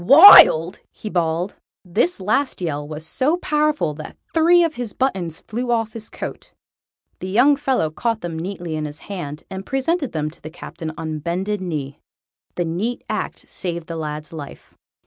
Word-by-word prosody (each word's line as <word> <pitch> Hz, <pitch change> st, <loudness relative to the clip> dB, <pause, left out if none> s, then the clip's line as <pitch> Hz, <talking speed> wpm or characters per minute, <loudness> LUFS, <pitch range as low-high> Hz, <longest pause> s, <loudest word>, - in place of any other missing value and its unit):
"Wild!!" 185 Hz, -, +9 dB
he 215 Hz, -, -8 dB
bawled. 170 Hz, +2 st, -1 dB, 0.3 s
This 195 Hz, -, +1 dB
last 220 Hz, +8 st, 0 dB
yell 150 Hz, -5 st, -3 dB
was 155 Hz, +1 st, -6 dB
so 285 Hz, -, +1 dB
powerful 300 Hz, -, 0 dB
that 155 Hz, +1 st, -10 dB, 0.2 s
three 345 Hz, +2 st, +5 dB
of 330 Hz, -2 st, 0 dB
his 245 Hz, -7 st, -5 dB
buttons 185 Hz, -11 st, -2 dB
flew 245 Hz, +3 st, -4 dB
off 225 Hz, -2 st, 0 dB
his 225 Hz, -1 st, -7 dB
coat. -, -, -8 dB, 0.7 s
The 185 Hz, -, -5 dB
young 250 Hz, +9 st, +5 dB
fellow 265 Hz, -, 0 dB
caught 225 Hz, +6 st, -2 dB
them 165 Hz, -2 st, -5 dB
neatly 175 Hz, -2 st, -5 dB
in 155 Hz, 0 st, -3 dB
his 150 Hz, 0 st, -7 dB
left -, -, -17 dB
hand, 160 Hz, -6 st, -6 dB
and 190 Hz, 0 st, -5 dB
presented 275 Hz, -, -1 dB
them 155 Hz, -1 st, -2 dB
to -, -, -18 dB
the 155 Hz, -, -8 dB
Captain 160 Hz, -1 st, -7 dB
on 160 Hz, -1 st, -4 dB
bended 185 Hz, +6 st, -2 dB
knee. 150 Hz, -6 st, -5 dB, 0.5 s
The 175 Hz, -, -1 dB
neat 195 Hz, +9 st, -3 dB
act -, -, -4 dB
saved 170 Hz, -3 st, -5 dB
the 165 Hz, -, -6 dB
lad's 155 Hz, 0 st, -5 dB
life. 145 Hz, -3 st, -10 dB
180 Hz, 175 wpm, -21 LUFS, 160-245 Hz, 0.7 s, Wild